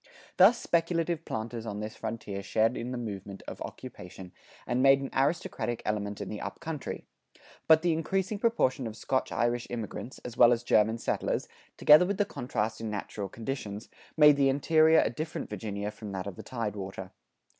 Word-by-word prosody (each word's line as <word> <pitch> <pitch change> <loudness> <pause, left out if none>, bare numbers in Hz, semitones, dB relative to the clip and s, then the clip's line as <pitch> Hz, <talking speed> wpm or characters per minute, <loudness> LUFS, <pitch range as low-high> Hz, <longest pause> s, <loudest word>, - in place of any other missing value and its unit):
[93:1] - - -27 0.3
Thus 200 +6 +7
speculative 165 -1 0
planters 115 +1 -4
on 105 -1 -4
this 105 +1 -5
frontier 110 -3 -5
shared 110 +4 +1
in 120 +2 -4
the 125 - -3
movement 100 -4 -6
of - - -7
occupation 90 0 -9 0.3
and 125 +1 0
made 135 0 +6
an 135 - -5
aristocratic 135 -5 -1
element 105 -1 -2
in 100 - -5
the 105 - -6
up - - -6
country; 160 -3 -5 0.6
but 160 0 +6
the 175 -2 +3
increasing 190 +5 -1
proportion 140 - +1
of 110 0 -8
Scotch 130 +2 -1
Irish 120 0 0
immigrants, 120 +2 -6
as 120 -1 -6
well 120 0 +7
as 120 0 +1
German 110 -1 +3
settlers, - - -1 0.3
together 155 +4 +7
with 200 0 -1
the 205 - +2
contrast 115 - -3
in 110 - -3
natural 105 -1 -5
conditions, 110 -2 -5 0.3
made 150 -2 +7
the 135 -1 +4
interior 155 +3 +5
a - - 0
different 155 +6 -5
Virginia 105 -1 -4
from 105 -1 -9
that 95 -1 -4
of 100 -2 -6
the - - -8
tidewater. 100 -5 -5
120 Hz, 180 wpm, -29 LUFS, 105-155 Hz, 0.6 s, Thus